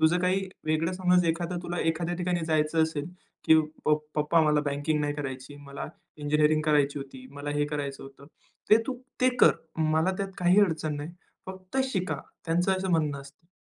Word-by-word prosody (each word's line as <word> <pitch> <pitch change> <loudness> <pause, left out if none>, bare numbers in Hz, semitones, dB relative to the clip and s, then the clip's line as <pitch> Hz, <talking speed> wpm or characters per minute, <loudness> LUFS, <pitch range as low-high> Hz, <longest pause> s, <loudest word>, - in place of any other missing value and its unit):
तुझं 165 +3 +4
काही 190 +1 +1 0.2
वेगळं 155 +3 +1
समज 180 -1 +3
एखादं 170 +2 -1
तुला 175 0 -4
एखाद्या 165 +2 0
ठिकाणी 180 0 -1
जायचं 155 0 +2
असेल 160 -2 -1 0.4
की 160 - +6 0.3
'पप्प 150 0 +3 0.2
पप्पा 150 +3 +3
मला 150 -1 +3
बँकिंग 145 +2 0
नाही 145 0 -1
करायची. 135 -1 -6
मला 140 -1 -7 0.3
इंजिनिअरिंग 150 +1 +2
करायची 145 -2 +2
होती. 135 -2 -9
मला 145 +1 -6
हे 145 0 +1
करायचं 145 -2 -4
होतं.' 135 +1 -13 0.4
ते 215 - +9
तू 265 - -2 0.3
ते 255 - +5
कर. - - +8 0.3
मला 160 +2 +2
त्यात 195 -1 -2
काही 180 +3 +5
अडचण 160 -6 +1
नाही. 145 +3 -6 0.4
फक्त 185 +4 -8 0.2
शिका." 185 -2 -1 0.3
त्यांचं 175 +3 +2
असं 190 0 -1
म्हणणं 150 -4 +1
असतं. 140 +4 -16
155 Hz, 175 wpm, -28 LUFS, 145-175 Hz, 0.4 s, ते